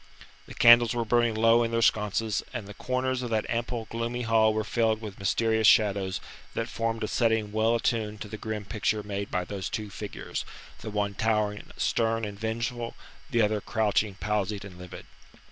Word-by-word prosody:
The - - -10
candles 120 0 +7
were 120 -1 0
burning 120 0 +2
low 115 +2 +5
in 115 - +1
their 115 0 +1
sconces, 105 0 +1
and 105 - -4
the 105 - -8
corners 130 +3 -1
of 120 - -4
that 110 -1 0
ample, 115 0 -2
gloomy 115 +1 -2
hall 110 -1 +4
were 110 0 -1
filled 110 0 +1
with 105 -3 -8
mysterious 110 +3 +2
shadows 100 -3 +3 0.4
that 115 - -1
formed 115 -1 -2
a - - 0
setting 110 -3 +1
well 110 +2 +2
attuned 110 -3 -1
to 110 - -5
the 105 - -7
grim 110 -1 -4
picture 105 0 -1
made 100 -1 -4
by 90 -1 -1
those 95 0 -4
two 105 -2 -4
figures - - -5 0.4
the - - -6
one 105 -1 -1
towering 105 -1 0
stern 115 -1 +1
and 100 -1 -7
vengeful, 115 +2 -3 0.3
the 120 -5 +3
other 105 0 +1
crouching 105 -2 0
palsied 105 0 -2
and 90 -2 -11
livid. 90 0 -10
110 Hz, 185 wpm, -27 LUFS, 105-115 Hz, 0.4 s, candles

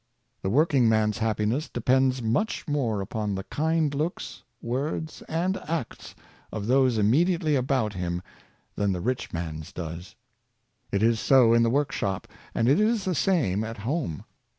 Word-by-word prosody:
The 95 - -1
working 135 -1 +3
man's 110 0 +2
happiness 110 +6 0
depends 130 +1 +1
much 120 - -1
more 125 -9 0
upon 105 0 -3
the 95 - -4
kind 160 +3 0
looks, 155 +5 -3 0.2
words, 145 +6 -3
and 180 +4 0
acts 160 -5 -5 0.4
of 105 -1 -4
those 130 0 +3
immediately 155 - +2
about 130 -5 0
him 90 -1 -3 0.5
than 100 -2 +1
the 90 - -3
rich 125 +6 -2
man's 80 -2 -5
does. 85 +1 -7 0.8
It 100 +1 +1
is 115 0 +3
so 125 -3 +5
in 115 - +5
the 115 - +3
workshop, 130 -8 -1 0.3
and 115 - +2
it 140 +7 +4
is 215 -1 +2
the 185 - 0
same 140 - +1
at 115 +1 -6
home. 115 - -3
120 Hz, 150 wpm, -26 LUFS, 105-150 Hz, 0.8 s, so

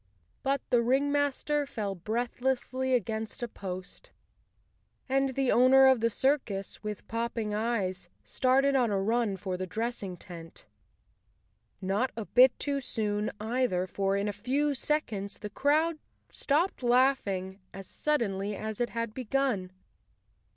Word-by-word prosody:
But 275 0 0
the 240 - +5
ringmaster 285 +3 +1
fell 210 -7 -3
breathlessly 245 +5 -1
against 220 0 -3
a - - -1
post, 185 -4 -8 1.0
and 270 0 +1
the 270 -2 +2
owner 260 +2 +6
of 265 -2 +6
the 230 +1 +2
circus, 230 -6 -1
with 210 -2 -6
popping 230 -2 -2
eyes, 210 -4 -1
started 270 +2 +2
on 250 -3 +3
a 200 -2 +1
run 220 0 +1
for 185 -1 -4
the 185 0 -4
dressing 210 -2 -3
tent. 165 -2 -11 1.2
Not 200 +7 0
a 225 - -3
bit 250 +3 +5
too 280 -1 -1
soon, 210 -4 -1
either, 220 -4 0
for 195 +1 0
in 200 +1 -1
a 205 - -1
few 270 +8 0
seconds 230 -9 -2
the 210 -2 -7
crowd 310 +6 +2 0.3
stopped 310 +5 0
laughing 240 -7 +2
as 195 0 -9
sud¬ 300 -2 0
denly 200 -1 -2
as 220 +1 -4
it 240 - +1
had 230 -2 -3
begun. 250 -6 -1
235 Hz, 135 wpm, -29 LUFS, 200-265 Hz, 1.2 s, owner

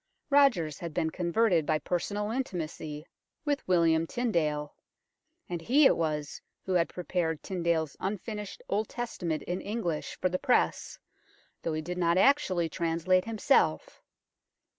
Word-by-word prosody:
Rogers 235 - +4
had 170 -3 -6
been 160 - 0
converted 180 0 +2
by 155 +1 +1
personal 205 +6 -2
in 265 +3 0
timacy 155 -6 -6 0.4
with 290 -2 -1
William 165 -2 +3
Tyndale, 155 -12 -1 0.7
and 175 -2 -4
he 275 - +4
it - - +6
was 150 -3 -2 0.2
who 190 - -1
had 170 -2 +2
prepared 175 -3 -2
Tyndale 170 -3 0
's 145 - -17
unfinished 210 +1 -5
Old 210 +2 -1
Testament 180 -10 -3
in 180 +2 -3
English 200 -8 -3
for - - +2
the 185 0 -2
press, 255 -3 +1 0.6
though 165 - -2
he 155 0 -2
did 180 +2 -4
not 170 0 +3
actually 190 - +3
translate 170 +2 +1
himself. 205 - +1
175 Hz, 140 wpm, -29 LUFS, 160-210 Hz, 0.7 s, it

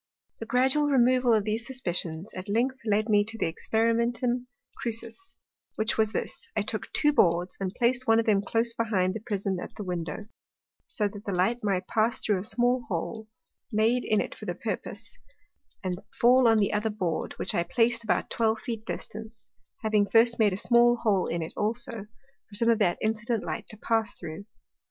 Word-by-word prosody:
The 225 - -6
gradual 265 +5 +3
removal 255 -2 +4
of 215 -2 +4
these 220 +2 -1
suspicions, 175 -8 -3
at 185 +2 -7
length 250 +5 +1
led 215 +1 +2
me 205 -2 +4
to 220 +2 -7
the - - 0
Experimentum 235 +6 0 0.3
Crucis, 235 +11 -5 0.4
which 220 +1 0
was 220 -1 +2
this; - - -4
I - - +1
took - - -4
two 295 -1 +2
Boards, 175 -6 +2
and 190 -1 -2
plac'd 250 +1 +1
one 225 0 +5
of 230 - +1
them 205 -3 +3
close 230 +3 +1
behind 200 -6 0
the 220 - -4
Prism 200 -4 -2
at - - -8
the 210 - -6
Window, 175 -2 -4 0.7
so 210 - +1
that 205 0 -9
the 200 - -2
light 195 +7 +1
might 190 -3 0
pass 225 +3 +1
through 205 -3 0
a - - -5
small 245 +3 +1
hole, 215 +4 -4 0.4
made 225 +3 +2
in 215 - +2
it - - -3
for - - -10
the - - -2
purpose, - - -5 0.6
and 185 0 -3 0.2
fall 250 +1 +6
on 225 -1 +5
the 205 -1 +1
other 210 +1 0
Board, 185 -6 -2
which - - 0
I - - +2
plac'd 230 +7 +2
at 230 - -9
about - - 0
twelve 225 -1 +1
Feet 230 -3 -5
distance, 220 +1 -7 0.3
having 210 -2 +2
first 230 +2 +4
made 210 -2 +4
a 185 - -2
small 240 +2 +4
hole 210 -6 +1
in 170 -1 -2
it 160 - -6
also, 225 0 -2 0.4
for 205 - -10
some 230 +3 +3
of 230 - +2
that 180 -5 +2
incident 220 +1 -1
Light - - -4
to 215 - -4
pass 225 +1 0
through. 165 +3 -7
220 Hz, 195 wpm, -27 LUFS, 200-235 Hz, 0.7 s, fall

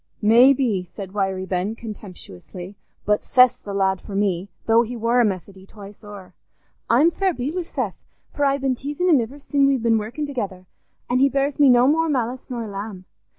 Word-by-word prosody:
"Maybe," 235 -2 +4
said 190 +1 -9
Wiry 190 -2 -1
Ben, 190 +4 -2
contemptuously, 190 - -10 0.3
"but 210 0 +2
Seth's 250 -1 +4
the 205 - -8
lad 190 -1 0
for 200 - -8
me, 195 -2 -1 0.2
though 225 +1 +4
he 240 +1 -4
war 235 +2 +2
a - - +4
Methody 190 -1 -4
twice 205 +1 -13
o'er. 205 -3 -11 0.6
I'm 285 +9 +4
fair 380 -1 -1
beat 260 +5 -3
wi' 365 - -2
Seth, 335 - -5 0.3
for 290 - -2
I've 275 0 +1
been 270 -1 +1
teasin' 290 +8 -2
him 295 -7 +5
iver 240 +5 -6
sin' 280 -1 +1
we've 270 -4 +1
been 225 -1 +3
workin' 230 +8 -4
together, 205 -10 -5 0.4
an' 250 +1 +1
he 275 +1 +4
bears 275 +1 -1
me 285 -2 +6
no 245 0 +5
more 325 +3 +2
malice 250 -2 -2
nor 240 -2 -4
a - - -7
lamb. 200 -2 -7
230 Hz, 195 wpm, -22 LUFS, 200-275 Hz, 0.6 s, me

